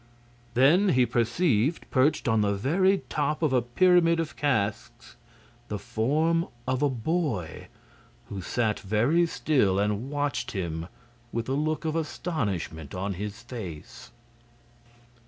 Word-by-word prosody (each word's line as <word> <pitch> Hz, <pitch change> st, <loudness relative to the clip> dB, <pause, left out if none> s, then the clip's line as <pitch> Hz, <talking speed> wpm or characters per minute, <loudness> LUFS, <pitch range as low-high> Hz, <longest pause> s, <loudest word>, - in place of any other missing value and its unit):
Then 160 Hz, -, +5 dB
he 125 Hz, -6 st, +4 dB
perceived, 120 Hz, +4 st, +1 dB
perched 135 Hz, +2 st, +2 dB
on 110 Hz, -2 st, +3 dB
the 100 Hz, -1 st, +1 dB
very 185 Hz, -, +2 dB
top 150 Hz, +2 st, -1 dB
of 150 Hz, -4 st, +2 dB
a 125 Hz, -, +4 dB
pyramid 170 Hz, +6 st, +3 dB
of 165 Hz, -2 st, -3 dB
casks, 120 Hz, -3 st, -2 dB, 0.5 s
the 105 Hz, -, -3 dB
form 145 Hz, -, 0 dB, 0.2 s
of 130 Hz, +1 st, 0 dB
a 145 Hz, -, +3 dB
boy, 130 Hz, -, -2 dB, 0.6 s
who 100 Hz, -2 st, -6 dB
sat 110 Hz, +3 st, -1 dB
very 120 Hz, -, +2 dB
still 130 Hz, -, +1 dB
and 105 Hz, +5 st, -1 dB
watched 145 Hz, 0 st, -2 dB
him 85 Hz, -4 st, -3 dB, 0.4 s
with 115 Hz, 0 st, -3 dB
a -, -, -2 dB
look 155 Hz, +3 st, -1 dB
of 155 Hz, 0 st, -1 dB
astonishment 105 Hz, -, -3 dB
upon 95 Hz, +2 st, -2 dB
his 100 Hz, +3 st, -6 dB
face. 100 Hz, -11 st, -8 dB
125 Hz, 130 wpm, -27 LUFS, 105-155 Hz, 0.6 s, Then